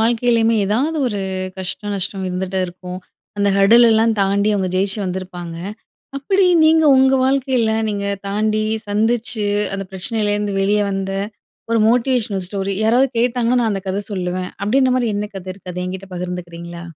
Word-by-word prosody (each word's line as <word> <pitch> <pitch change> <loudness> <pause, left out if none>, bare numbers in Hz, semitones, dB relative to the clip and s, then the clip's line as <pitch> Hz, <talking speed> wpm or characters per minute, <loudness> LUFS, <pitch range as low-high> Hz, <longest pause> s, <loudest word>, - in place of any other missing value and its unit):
வாழ்க்கையிலயுமே 230 0 +2
ஏதாவது 270 +10 0
ஒரு 210 -5 -2 0.4
கஷ்டம், 205 +2 -4
நஷ்டம் 190 0 -3
இருந்துட்டே 190 +1 -2
இருக்கும். 180 +1 -8 0.4
அந்த 200 0 +2
ஹர்டில் 225 +5 +6
எல்லாம் 225 0 +3
தாண்டி, 200 +1 +2
அவுங்க 190 -2 0
ஜெயிச்சு 195 +2 +1
வந்திருப்பாங்க. 180 -2 -5 0.6
அப்பிடி 380 +7 +2 0.2
நீங்க 320 0 +5
உங்க 265 0 +4
வாழ்க்கையில 260 -4 +1 0.2
நீங்க 200 -1 -2 0.2
தாண்டி, 215 +1 0 0.2
சந்திச்சு, 220 +1 0 0.3
அந்த 195 0 -4
பிரச்சனையிலருருந்து 205 +1 -1
வெளிய 205 +2 +2
வந்த 195 0 -3 0.6
ஒரு 230 - +3
மோட்டிவேஷனல் 230 -5 +1
ஸ்டோரி 195 0 -3
யாராவது 245 +5 +4
கேட்டாங்கன்னா, 245 0 +2
நான் 225 -2 +1
அந்த 195 -1 -3
கத 190 +2 -1
சொல்லுவேன். 180 -1 -3
அப்பிடின்றமாரி 255 +2 +2
என்ன 210 0 -3
கத 190 - -8
இருக்கு? 185 -1 -10
அத 180 - -5
என்கிட்டே 190 +1 -6
பகிர்ந்துக்கிறீங்களா? 175 -1 -6
205 Hz, 145 wpm, -19 LUFS, 190-235 Hz, 0.6 s, ஹர்டில்